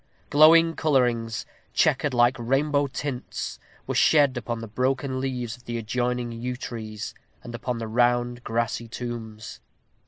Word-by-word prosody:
Glowing 165 +2 +7
colorings, 120 -7 +1 0.3
checkered 150 - +2
like 120 +1 +4
rainbow 140 +4 +1
tints, 135 -1 -5 0.3
were - - -2
shed 145 -4 +4
upon 120 -1 -3
the 115 - -6
broken 130 +3 -1
leaves 125 -4 -3
of 125 - -21
the 120 0 -3
adjoining 120 +2 -1
yew 120 +2 -4
trees, 110 -4 -6 0.3
and 120 - -8
upon 120 +1 -3
the 115 -1 -4
rounded 120 +1 +1
grassy 115 0 -1
tombs. 115 -2 -7
120 Hz, 135 wpm, -25 LUFS, 115-130 Hz, 0.3 s, Glowing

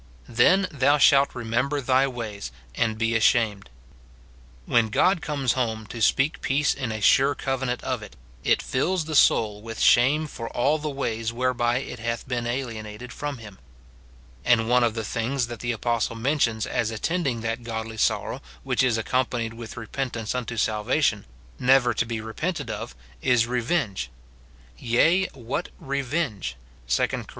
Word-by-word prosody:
"Then 185 +12 +4
thou 145 0 +3
shalt 140 -1 +5
remember 125 +5 -1
thy 130 0 +3
ways, 110 - -6 0.2
and 110 - 0
be 115 0 0
ashamed." 110 - +2 1.0
When 115 -2 +2
God 180 - +3
comes 140 -6 0
home 110 -4 -2
to 115 - -6
speak 135 +7 +2
peace 140 +2 +2
in 130 -5 -4
a 110 - -3
sure 135 +7 +4
covenant 130 -2 -2
of 130 -3 -2
it, 105 - -11 0.3
it - - +2
fills 165 +6 0
the 160 - -5
soul 105 -7 +4
Avith 115 0 -7
shame 140 +6 +4
for 115 -6 -6
all 145 +6 +1
the 150 0 -3
ways 115 -5 -2
whereby 120 0 +1
it 125 -2 -5
hath 115 +1 -3
been 120 -2 -2
alienated 120 -2 -5
from 145 -2 -4
him. 105 -4 -12 0.8
And 115 -2 +3
one 125 +1 +4
of 115 -1 +1
the 110 - -2
things 120 +4 -1
that 120 -1 -8
the 120 - -1
apostle 115 0 -1
men 140 +7 0
tions 110 -4 +1
as 115 - -1
attending 130 +2 -1
that 115 +1 -2
godly 110 -1 -5
sorrow - - 0 0.2
which 130 -1 +1
is 125 -3 +2
accompa 120 0 0
nied 110 - -9
Avith 115 0 -9
repentance 115 -1 -3
unto 125 -2 -4
salvation, 110 +2 +1 0.3
never 125 -1 +4
to 115 +1 -1
be 115 -1 -3
repented 155 +11 -3
of, - - -6 0.3
is 125 -3 +3
revenge: 120 - -1 0.7
"Yea, 160 +11 +3
what 120 -1 -4
revenge!" 135 - -2 0.3
2 - - +2
Cor. - - -5
120 Hz, 160 wpm, -25 LUFS, 115-135 Hz, 1.0 s, shalt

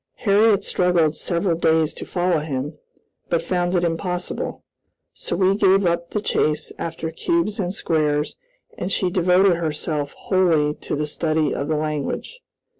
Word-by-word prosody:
Harriot 205 -1 +3
struggled 175 -5 +2
several 170 +1 0
days 160 -1 +2
to - - -8
follow 175 -2 +1
him, 145 0 -4 0.5
but 170 - +1
found 180 0 0
it 175 - +2
impossible, 175 +1 -2 0.5
so - - -4
we 190 0 +3
gave 195 -1 +4
up 170 0 0
the 210 - -1
chase 155 -6 0
after 160 -1 -4
cubes 275 - -1
and 185 0 -2
squares, 150 -3 0 0.4
and 180 - -3
she 185 -2 +1
devoted 180 0 +4
herself 150 -2 -2
wholly 165 -6 +2
to - - -5
the 150 +1 -1
study 155 0 0
of 140 - -3
the 155 -1 0
language. 155 - -3
170 Hz, 150 wpm, -22 LUFS, 155-185 Hz, 0.5 s, gave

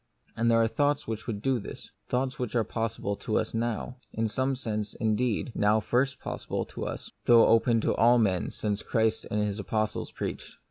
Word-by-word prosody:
And 115 0 +2
there 115 0 +5
are 115 - +4
thoughts 145 +4 +1
which 110 -1 -4
would 105 -3 -4
do 135 -2 +2
this; - - -9 0.2
thoughts 130 +1 -1
which 125 -2 -3
are 115 - +3
possible 110 -2 -2
to 110 - -1
us - - -1
now: 120 +2 -2
in 110 0 -1
some 130 +4 0
sense, 110 -5 -4
indeed, 115 +2 0
now 105 +1 +3
first 130 +5 0
possible - - -4
to - - -4
us, - - -6
though 115 -1 +7
open 115 0 +4
to - - +1
all 120 +2 +5
men 95 -6 +1
since 105 -1 -3
Christ 110 -1 0
and 105 0 0
His 105 0 -2
apostles 110 +3 -2
preached. - - -5
115 Hz, 195 wpm, -28 LUFS, 105-125 Hz, 0.2 s, though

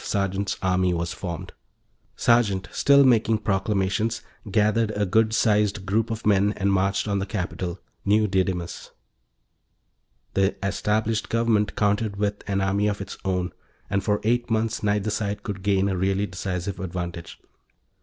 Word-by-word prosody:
Sergeant's 100 0 -1
army 90 -1 +2
was 85 +1 -2
formed; 85 -2 -6 0.6
Sergeant, 105 -6 +2
still 140 0 +5
making 115 -4 +4
proclamations, 100 +1 0 0.3
gathered 110 +2 +2
a 105 0 +1
good 110 +4 +3
sized 105 -2 +2
group 110 +4 +1
of 115 0 -5
men 100 0 +3
and 100 0 +1
marched 95 +2 +1
on 100 -1 0
the 95 - -2
capital, 90 -3 -4 0.2
New 105 +2 +3
Didymus. 95 -3 -2 1.4
The 95 0 +2
established 110 +3 0
government 115 -2 +1
countered 105 0 +1
with 105 0 -1
and 100 -1 0
army 100 +2 +1
of 105 -1 -1
its 100 - -6
own, 90 -2 -1 0.4
and 100 -1 +1
for 105 0 +1
eight 120 +2 +1
months, 110 0 0
neither 105 0 0
side 105 -1 -2
could 100 -3 -5
gain 100 0 +2
a 95 - 0
really 95 +2 +1
decisive 95 0 -4
advantage. 85 -2 -5
100 Hz, 145 wpm, -24 LUFS, 95-110 Hz, 1.4 s, still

